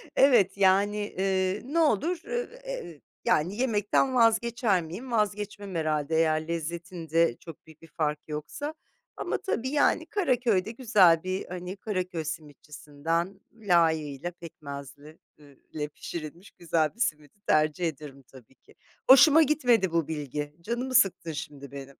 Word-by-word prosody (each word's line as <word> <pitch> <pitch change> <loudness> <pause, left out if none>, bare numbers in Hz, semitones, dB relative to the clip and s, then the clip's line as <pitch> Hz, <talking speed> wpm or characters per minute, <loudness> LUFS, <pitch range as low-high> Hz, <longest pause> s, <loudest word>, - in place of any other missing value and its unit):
Evet, 220 -9 +4
yani, 200 +2 +3
eee, 190 -1 -1
ne 300 +6 -1
olur? 320 - +2
Iıı, 485 0 -2
eee, - - -14
eee, - - -4
ııı, 155 - -16 0.3
yani 170 +6 +1
yemekten 240 +1 +1
vazgeçer 230 -3 +3
miyim? 190 +11 -8
Vazgeçmem 205 -3 -2
herhâlde 155 -1 -1
eğer 160 -1 +1
lezzetinde 170 -2 -1
çok 165 -3 -12
büyük 160 -1 -17
bir 165 - -14
fark 150 -1 -2
yoksa. 155 - -5 0.4
Ama - - -2
tabii 260 - -2
yani 285 +1 +2
Karaköy'de 240 - +1
güzel 205 -9 +4
bir 185 +1 -3
,hani, 180 +2 -6
Karaköy 185 -5 -3
simitçisinden 155 +3 -4
layığıyla 165 -7 +1
pekmezli, 145 -3 -10 0.2
ııı, 145 -2 -18 0.2
le 150 -1 -2
pişirilmiş 165 +4 -8
güzel 165 -1 -1
bir - - -23
simidi 155 - -2
tercih 155 +3 +2
ederim 145 -3 -8
tabii 130 -1 -17
ki. - - -24 0.3
Hoşuma 290 +4 +8
gitmedi 245 - +2
bu 165 -2 0
bilgi, 150 -1 -5
canımı 240 +7 -3
sıktın 195 -7 +3
şimdi 145 -3 -8
benim. 140 -1 -9
175 Hz, 140 wpm, -27 LUFS, 155-220 Hz, 0.4 s, Hoşuma